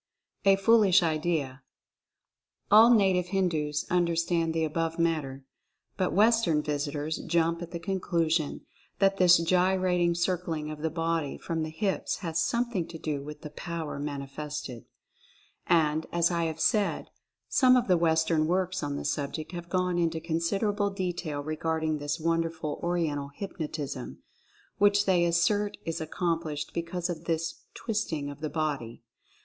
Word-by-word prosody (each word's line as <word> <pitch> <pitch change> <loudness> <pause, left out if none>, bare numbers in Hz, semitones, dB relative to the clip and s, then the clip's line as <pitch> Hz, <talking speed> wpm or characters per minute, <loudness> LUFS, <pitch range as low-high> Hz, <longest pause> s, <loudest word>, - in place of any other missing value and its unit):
A 195 0 +7
FOOLISH 195 -2 +5
IDEA. 155 -4 -1 1.1
All 220 +3 +8
native 190 -5 +3
Hindus 160 -6 0
understand 170 -1 +1
the 160 0 0
above 165 +1 -2
matter, 150 -5 -1 0.5
but 185 -2 0
Western 210 -7 +3
visitors 145 +1 -2
jump 170 0 0
at 175 - -6
the 170 - -5
conclusion 170 -4 -1 0.3
that 195 0 +3
this 180 -2 +7
gyrating 180 0 +2
circling 170 -3 -2
of 150 -1 -8
the 160 - 0
body 165 -2 -2
from 165 -1 -3
the 155 - -2
hips 190 +5 -2
has 165 0 0
some 240 0 0
thing 180 -7 -2
to 165 - -8
do 150 -3 -3
with 150 +2 -9
the 150 - -8
"power" 165 -3 -5
manifested. 140 -3 -5 0.8
And, 160 -2 +2
as 170 0 +2
I 170 -1 0
have 160 0 -4
said, 210 0 +1 0.4
some 255 -2 +5
of 245 - 0
the 185 - +4
Western 160 -1 +2
works 185 +1 0
on 145 -1 -3
the - - -5
subject 150 +2 -3
have 175 -1 -7
gone 180 -1 0
into 165 -1 0
considerable 195 +6 0
detail 175 -6 -3
regarding 155 0 -1
this 145 +1 -3
won 165 +1 +1
derful 160 -2 -4
"Oriental 160 -5 -1
Hypnotism," 150 - -5 0.6
which 205 0 +4
they 180 -3 +3
assert 185 +5 +1
is 165 -1 -3
ac 155 - -5
complished 160 -4 -2
because 170 +1 -3
of 170 -2 -5
this 165 -1 -2
twisting 165 -11 -2
of 145 - -11
the 155 - -2
body. 140 -8 -3
165 Hz, 150 wpm, -28 LUFS, 155-180 Hz, 1.1 s, All